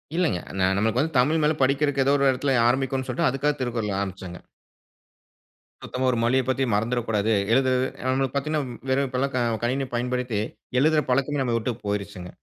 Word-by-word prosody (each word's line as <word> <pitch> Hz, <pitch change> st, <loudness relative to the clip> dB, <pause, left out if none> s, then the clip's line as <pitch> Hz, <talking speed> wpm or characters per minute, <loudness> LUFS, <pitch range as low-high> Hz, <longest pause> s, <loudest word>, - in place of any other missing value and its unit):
இல்லைங்க. 170 Hz, -, +1 dB, 0.2 s
நா 95 Hz, -, +3 dB
நமக்கு 110 Hz, +4 st, +1 dB
வந்து 160 Hz, +1 st, -1 dB
தமிழ் 155 Hz, +6 st, +3 dB
மேல 150 Hz, -, +3 dB
படிக்கிறக்கு 140 Hz, +1 st, +2 dB
ஏதோ 140 Hz, -, +3 dB
ஒரு 140 Hz, 0 st, +3 dB
எடத்துல 135 Hz, +1 st, 0 dB
ஆரம்பிக்கும்னு 130 Hz, +1 st, 0 dB
சொல்லிட்டு 125 Hz, 0 st, +1 dB
அதுக்காக 140 Hz, +3 st, 0 dB
திருக்குறள் 115 Hz, -5 st, -2 dB
ஆரம்பிச்சங்க. 95 Hz, -2 st, -6 dB, 1.5 s
சுத்தமா 130 Hz, +1 st, -3 dB
ஒரு 120 Hz, -, -1 dB
மொழிய 130 Hz, +3 st, +3 dB
பத்தி 130 Hz, +1 st, +1 dB
மறந்துறக்கூடாது. 115 Hz, -1 st, 0 dB, 0.2 s
எழுதுறது 130 Hz, 0 st, +2 dB, 0.2 s
நமக்கு 135 Hz, 0 st, 0 dB
பாத்தீங்கன்னா 150 Hz, +1 st, -1 dB, 0.3 s
வெறும் 135 Hz, +1 st, +2 dB
இப்பல்லாம் 130 Hz, +2 st, -2 dB
க -, -, +1 dB, 0.2 s
கணினி 130 Hz, +2 st, 0 dB
பயன்படுத்தி, 125 Hz, -3 st, -1 dB, 0.4 s
எழுதுற 155 Hz, +2 st, +3 dB
பழக்கமே 140 Hz, +2 st, +1 dB
நம்மள 120 Hz, -3 st, 0 dB
வுட்டு 115 Hz, +2 st, -2 dB
போயிருச்சுங்க. 100 Hz, -3 st, -4 dB
130 Hz, 160 wpm, -24 LUFS, 115-140 Hz, 1.5 s, நா